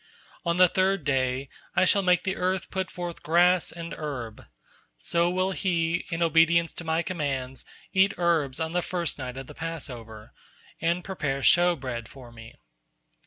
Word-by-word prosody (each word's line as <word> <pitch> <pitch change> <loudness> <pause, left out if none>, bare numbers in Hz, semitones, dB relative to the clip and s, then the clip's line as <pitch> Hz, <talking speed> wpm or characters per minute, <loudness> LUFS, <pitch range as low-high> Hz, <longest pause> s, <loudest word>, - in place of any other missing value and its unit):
On 170 0 0
the 185 0 +7
third 190 0 +1
day, 135 -1 0 0.3
I 185 - +4
shall 200 +2 +4
make 180 -2 +3
the 190 0 -1
earth 185 0 -1
put 190 -2 -2
forth 175 -1 -6
grass 175 +2 +3
and 170 0 -7
herb; 125 -8 -6 0.5
so 170 - +1
will 185 +1 0
he, 175 -3 0
in 170 0 0
obedience 165 +1 +4
to - - -7
My 160 +1 0
commands, 135 -7 -3 0.3
eat 190 +1 +4
herbs 165 -6 +1
on 160 0 -2
the 175 +1 +1
first 170 -5 -3
night 130 -1 -5
of 135 - -6
the - - -11
Passover, 120 -10 -7 0.5
and 170 +2 0
prepare 140 -8 -2
showbread 135 -10 +3
for 125 -3 -13
Me. 115 0 -13
165 Hz, 165 wpm, -27 LUFS, 135-180 Hz, 0.5 s, the